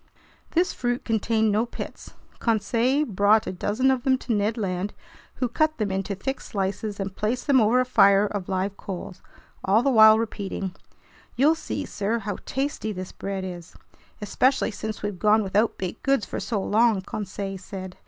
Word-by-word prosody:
This 350 +2 +2
fruit 245 0 -2
contained 220 -1 +1
no 220 +3 +1
pits. - - -8 0.2
Conseil 235 +5 +1
brought 210 0 +3
a - - -3
dozen 215 +8 +1
of 260 -2 0
them 260 -1 +3
to 245 - -3
Ned 210 +2 0
Land, 195 -1 -2 0.4
who 250 - -1
cut 310 +6 +1
them 210 -3 -1
into 195 +1 -2
thick 270 +8 -4
slices 200 +1 -3
and 195 -1 -4
placed 225 +4 -2
them 275 -4 +5
over 225 +4 +4
a 255 - +2
fire 200 -5 +5
of 205 -3 -4
live 190 +1 -1
coals, 185 -1 -7 0.4
all 210 +5 +3
the 275 - +3
while 220 -2 +8
repeating: 200 -4 -3 0.6
"You'll 285 +6 +4
see, 295 -2 -4
sir, 210 +3 -2
how 205 -2 -4
tasty 270 -5 -2
this 185 -2 -6
bread 195 -1 -5
is!" 175 -2 -8 0.5
"Especially 260 +4 +2
since 215 0 -6
we've 205 -3 -3
gone 215 +2 +4
without 205 +3 +1
baked 185 +3 -5
goods 270 -5 +1
for - - -5
so 220 -4 -2
long," 220 -1 +3
Conseil 195 -1 -5
said. 185 -1 -8
215 Hz, 175 wpm, -25 LUFS, 195-240 Hz, 0.6 s, while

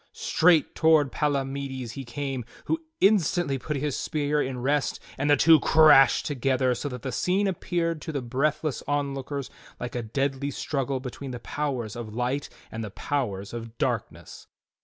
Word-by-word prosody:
Straight 165 -3 +3
toward 155 -4 +4
Pala 145 -3 0
mides 135 -3 -5
he 135 +2 -6
came, 135 0 -4 0.2
who 320 0 -1 0.2
instantly 175 -8 +3
put 150 +3 -3
his 145 0 -2
spear 150 -1 0
in 130 -2 -3
rest 140 +3 0 0.2
and 145 +2 -1
the 145 - +6
two 160 -1 +7
crashed 150 -3 +6
together 130 -2 +1
so 145 +4 -4
that 125 -3 -7
the 130 - -3
scene 185 +11 +1
appeared 170 -3 -1
to 160 - -5
the 140 -4 -3
breathless 140 +4 -1
onlookers 140 -1 -2 0.3
like 120 0 -5
a 120 - -2
deadly 135 +4 -1
struggle 135 -1 -2
between 130 +1 -7
the 125 -1 -5
powers 125 -5 -3
of 110 -2 -7
Light 125 +4 -1 0.2
and 115 0 -5
the 105 - -5
powers 100 -5 -3
of 115 -1 -7
Darkness. - - -3
140 Hz, 165 wpm, -26 LUFS, 125-150 Hz, 0.3 s, two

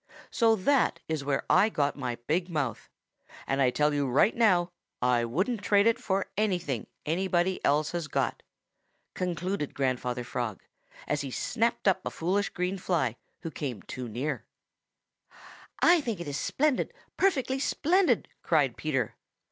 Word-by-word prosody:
So 225 -2 +4
that 265 +7 +2
is 155 -3 -2
where 140 -1 0
I 215 - +5
got 145 -8 0
my 125 -4 -3
big 175 +6 0
mouth, 145 -9 -3 0.6
and 135 +1 0
I 130 - +5
tell 150 +3 +2
you 145 -1 +1
right 140 - +4
now 180 -7 +3 0.3
I 125 -1 +2
wouldn't 190 - -1
trade 205 0 +4
it 230 +1 +3
for 195 -5 0
anything 175 - -1 0.2
anybody 180 +2 0
else 150 +1 +2
has 170 -3 -3
got," - - -1 0.7
concluded 180 -2 -2
Grandfather 125 -2 -1
Frog, 120 -4 -4 0.4
as 150 0 0
he 140 - -4
snapped 230 - -1
up 190 -1 +3
a - - -2
foolish 195 +5 0
green 180 +2 -2
fly 155 - 0 0.3
who 165 - -5
came 130 -11 -5
too 125 -2 -6
near. 125 +1 -3 1.4
"I 345 -1 +6
think 230 -9 -3
it 170 - -6
is 145 - -3
splendid, 290 - 0 0.2
perfectly 270 -8 +1
splendid," 330 - +2
cried 145 -7 +2
Peter. 135 -7 -1
170 Hz, 150 wpm, -28 LUFS, 135-205 Hz, 1.4 s, I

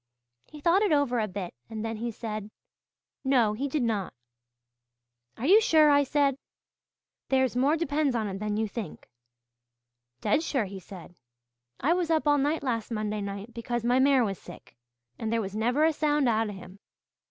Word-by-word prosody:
He 300 - -12
thought 340 +6 +3
it 415 -4 +2
over 285 -5 +2
a 215 - 0
bit, 185 -2 -6 0.2
and 220 0 -5
then 225 -1 -3
he 235 +2 -3
said, 215 -2 -5 0.7
'No, 250 -6 +3
he 265 +7 -2
did 285 -1 -1
not.' 215 -5 -2 1.2
'Are 245 - -4
you 405 +8 +7
sure?' 310 -7 +5
I 285 0 +5
said. 280 -1 +1 0.9
'There's 260 -2 +2
more 280 +6 +3
depends 295 -4 0
on 220 -2 -1
it 195 -1 -5
than 210 0 -2
you 220 0 0
think!' 210 -4 -7 1.1
'Dead 300 - +1
sure,' 270 -8 -1
he 195 0 -8
said. 180 -2 -12 0.7
'I 305 +7 +3
was 350 -2 -1
up 315 -2 +1
all 290 0 +4
night 295 +3 0
last 230 -4 -2
Monday 215 -2 -2
night 200 +3 -6
because 235 0 -3
my 245 +2 +3
mare 265 -2 +4
was 195 -3 -4
sick, 175 - -13 0.4
and 220 -1 -2
there 230 - +1
was 200 -2 -4
never 245 +8 +2
a 320 - +3
sound 295 -2 +1
out 225 -1 +1
of 205 - -7
him. 190 +1 -12
240 Hz, 185 wpm, -28 LUFS, 215-290 Hz, 1.2 s, you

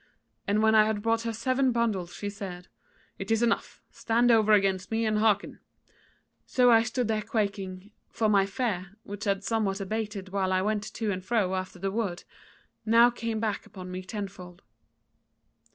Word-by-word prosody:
And 210 +2 +2
when 220 0 +4
I 215 -1 +6
had 210 -1 -2
brought 225 0 +1
her 230 0 -2
seven 255 +4 +1
bundles, 215 -7 -1
she 205 - -5
said: 195 -3 -7 0.5
'It 195 - -6
is 225 +1 +2
enough: 235 -1 -1
stand 235 +2 +2
over 215 -2 +4
against 195 -3 +2
me 225 0 0
and 215 -1 +1
hearken.' 215 -2 +1 0.9
So 250 -1 +4
I 225 -1 +7
stood 245 +1 -1
there 215 -1 0
quaking; 200 -2 -3 0.2
for 220 - 0
my 200 -2 +3
fear, 195 -3 -3
which 205 +2 -7
had 200 -1 0
somewhat 210 -3 0
abated 205 -1 -4
while 190 -1 -1
I 185 0 +2
went 210 0 -2
to 220 -3 -1
and 185 -1 -4
fro 195 -3 0
after 185 0 -4
the 195 +2 -2
wood, 195 -5 -2 0.6
now 230 +2 +5
came 230 -2 -3
back 215 -2 -2
upon 185 -2 -9
me 185 0 -4
tenfold. 185 -3 -8
210 Hz, 175 wpm, -28 LUFS, 195-225 Hz, 0.9 s, I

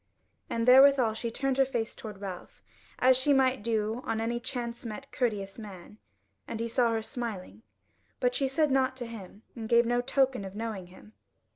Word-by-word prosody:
And 230 +1 -1
therewithal 260 -3 +7
she 230 +1 -4
turned 270 +3 -1
her - - +7
face 235 -4 -3
toward 210 -3 -9
Ralph, 190 -3 -8 0.3
as 255 +1 +5
she 260 +3 +3
might 260 -3 +3
do 220 +1 -1
on 220 - -2
any 235 +1 -1
chance 240 -1 -5
met 240 +4 -7
courteous 210 -5 -2
man, 205 -1 -11 0.5
and 225 - -5
he 230 - -1
saw 235 0 +2
her 225 -1 -1
smiling, 220 -5 -6 0.6
but - - +1
she 275 - +1
said 290 +2 +1
nought 260 -1 +2
to 245 - -5
him, 215 -2 -10
and 225 -2 -6
gave 235 0 +5
no 240 +1 +1
token 265 -2 +1
of 190 0 -8
knowing 215 -4 -5
him. 190 +4 -16
235 Hz, 185 wpm, -29 LUFS, 215-260 Hz, 0.6 s, therewithal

